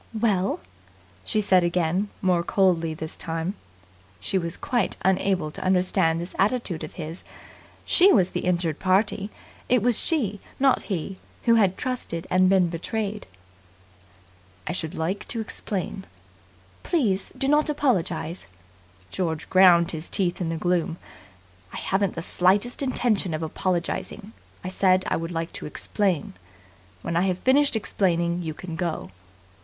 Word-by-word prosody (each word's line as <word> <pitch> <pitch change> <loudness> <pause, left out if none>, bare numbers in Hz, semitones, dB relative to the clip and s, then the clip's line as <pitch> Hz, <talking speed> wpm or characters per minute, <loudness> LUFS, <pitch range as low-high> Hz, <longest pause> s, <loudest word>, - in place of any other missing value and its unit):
"Well?" 200 -4 +1 0.6
she 215 - 0
said 185 -3 +4
again, 175 +3 0
more 180 -2 +3
coldly 170 -3 +1
this 155 0 -6
time. 165 +3 -3 0.7
She 100 - -3
was 170 0 -3
quite 240 -6 -1
unable 185 -4 +1
to - - -6
understand 180 -3 +2
this 175 +2 -6
attitude 200 -5 0
of - - -8
his. 165 +1 -6 0.6
She 380 +3 +6
was 185 -4 +4
the - - -2
injured 170 -4 0
party. 195 +2 +1 0.4
It 245 -3 +3
was 245 -2 +2
she, 220 - -1 0.2
not 270 -1 +4
he 185 0 -3 0.2
who 230 - +4
had 200 -5 +3
trusted 250 -10 -3
and 185 0 +4
been 190 -2 +4
betrayed. 205 +5 -4 1.4
"I - - -2
should 160 -3 -3
like 175 +5 -3
to 230 - -3
explain." 195 -3 -4 0.8
"Please 210 - 0
do 270 - +1
not 300 +2 +3
apologize." 190 - -1 0.6
George 160 -4 -2
ground 180 -2 +6
his 160 0 -6
teeth 185 -3 0
in 170 - -1
the 165 - -2
gloom. 175 0 0 0.7
"I - - -7
haven't 195 0 0
the 165 - -4
slightest 200 +10 +2
intention 230 - 0
of 155 - -4
apologizing. 185 +5 -3 0.3
I - - -4
said 185 0 +3
I - - +1
would 165 +1 -4
like 165 0 -3
to - - -5
explain. 185 - -1 0.7
When 170 - -3
I 170 - +3
have 180 -1 0
finished 275 +5 +3
explaining, 175 -5 0
you 160 -2 -4
can 170 -1 -7
go." 165 - -3
185 Hz, 145 wpm, -25 LUFS, 170-205 Hz, 1.4 s, She